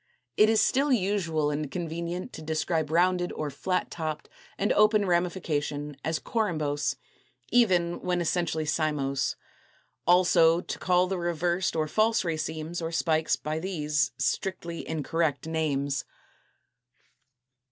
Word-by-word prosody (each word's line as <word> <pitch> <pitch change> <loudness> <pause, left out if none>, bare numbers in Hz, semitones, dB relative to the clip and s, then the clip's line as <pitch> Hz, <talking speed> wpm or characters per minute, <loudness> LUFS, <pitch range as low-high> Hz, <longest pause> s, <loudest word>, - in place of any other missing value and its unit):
It 215 +1 +5
is 220 -1 +4
still 275 +2 +2
usual 180 - +1
and 150 -1 -3
convenient 170 - -4
to - - -8
describe 155 0 -1
rounded 175 +2 +2
or 150 -2 -3
flat 180 +6 -2
topped 155 -2 -4 0.3
and 205 - +1
open 210 0 +4
ramification 155 -5 -1
as 160 0 0
corymbose, 155 -11 -1 0.6
even 180 -8 +3
when 180 -1 0
essentially 170 -2 0
cymose; 150 -3 0 0.7
also 175 -2 +5
to - - -6
call 180 0 +3
the 185 0 -2
reversed 175 +1 0
or 155 -1 0
false 220 +3 +2
racemes 160 +1 -3
or 165 0 -3
spikes 160 -1 +1
by 155 +1 -3
these 150 -6 0
(strictly 170 -3 -2
incorrect) 160 -1 -1
names. 145 -4 -1
165 Hz, 120 wpm, -27 LUFS, 155-180 Hz, 0.7 s, It